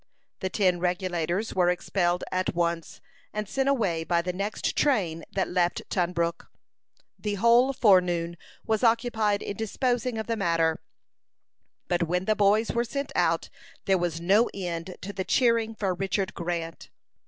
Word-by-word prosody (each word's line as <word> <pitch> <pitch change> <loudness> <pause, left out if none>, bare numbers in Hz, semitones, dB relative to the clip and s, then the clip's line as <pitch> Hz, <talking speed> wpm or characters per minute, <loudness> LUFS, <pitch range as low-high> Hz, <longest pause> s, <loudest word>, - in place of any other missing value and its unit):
The 190 - -2
ten 185 -3 +2
Regulators 180 +2 -1
were 180 -1 +3
expelled 180 0 0
at 185 -1 -1
once, 170 -1 -2 0.3
and 210 0 -3
sent 270 +5 0
away 195 -12 +1
by 170 0 +1
the 180 0 -2
next 200 +3 -2
train 180 - +1
that 190 - 0
left 175 -1 0
Tunbrook. 170 -2 -1 0.7
The 210 -1 -2
whole 235 +5 +5
forenoon 180 -8 +3 0.3
was 220 0 0
occupied 225 -3 +2
in 200 - -4
disposing 245 +2 -1
of 220 - -3
the 230 - -1
matter; 165 -5 +1 1.1
but 175 -1 0
when 180 +2 0
the 215 - +2
boys 210 +2 +3
were 235 - +1
sent 280 +4 -4
out, - - +1 0.4
there 190 -1 +3
was 170 -2 -2
no 200 +7 +3
end 180 -1 -4
to 200 +2 -6
the 190 - -2
cheering 230 0 +2
for 195 -4 -1
Richard 190 +1 -2
Grant. 170 -1 -4
190 Hz, 155 wpm, -27 LUFS, 175-220 Hz, 1.1 s, whole